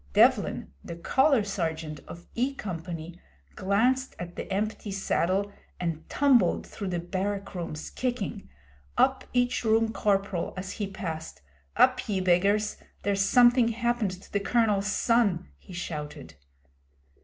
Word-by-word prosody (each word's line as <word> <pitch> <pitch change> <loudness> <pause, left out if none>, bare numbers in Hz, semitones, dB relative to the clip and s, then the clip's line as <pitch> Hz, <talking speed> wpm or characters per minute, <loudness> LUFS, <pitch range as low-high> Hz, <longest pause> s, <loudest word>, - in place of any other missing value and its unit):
Devlin, - - +3
the - - -6
Colour 265 - +3
Sergeant 160 -6 -3
of 175 0 -10
E 260 +4 0
Company, 170 -4 -6 0.3
glanced 245 +7 +1
at 175 0 -7
the - - -6
empty 210 +2 -2
saddle 195 0 0 0.3
and 165 -3 -3
tumbled 275 -4 +3
through 200 - -6
the 180 -1 -1
barrack 195 +3 -3
rooms, 165 -4 -5
kicking; 245 - -3 0.5
up 265 -1 +3
each 245 0 +1
Room 225 0 +3
Corporal 195 -4 0
as 185 +1 -4
he 205 - -3
passed. 165 - -6 0.3
'Up, - - +4
ye 195 -2 +1
beggars! 195 +4 +2 0.3
There's 200 -1 +1
something 240 +2 +6
happened 235 -5 -1
to - - -17
the 205 - +2
Colonel's 205 -2 +2
son,' 225 - +2
he - - -15
shouted. 150 - -6
200 Hz, 130 wpm, -28 LUFS, 175-230 Hz, 0.5 s, something